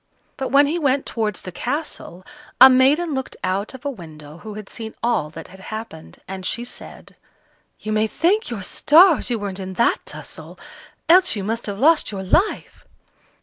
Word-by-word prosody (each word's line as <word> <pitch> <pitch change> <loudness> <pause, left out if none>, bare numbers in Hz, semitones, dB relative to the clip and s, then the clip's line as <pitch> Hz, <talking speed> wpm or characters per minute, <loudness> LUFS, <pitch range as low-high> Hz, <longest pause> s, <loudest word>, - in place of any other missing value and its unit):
But 265 - -4
when 280 +1 +5
he 320 +5 -1
went 275 -3 +1
towards 215 -4 -3
the 185 - -7
castle, 245 - -5 0.3
a 265 - +10
maiden 285 +6 +3
looked 265 -1 -5
out 195 +6 -2
of 260 - -13
a 285 - -1
window 155 - -12
who 215 +1 -9
had 210 -2 -8
seen 220 -1 -7
all 230 -10 0
that 155 - -11
had 190 +1 -14
happened, 215 -5 -9
and 190 0 -7
she 235 +5 -2
said: 245 - -11 0.6
"You 215 - -5
may 215 0 +1
thank 380 - 0
your 220 -5 -5
stars 315 - +4
you 240 - 0
weren't 200 -2 -5
in 190 0 -6
that 235 +5 +1
tussle, - - -9 0.5
else 365 -4 +5
you 200 - -4
must 225 +3 -3
have 200 -1 -4
lost 305 +4 +3
your 195 -2 -5
life." 360 - 0
225 Hz, 185 wpm, -21 LUFS, 190-280 Hz, 0.6 s, a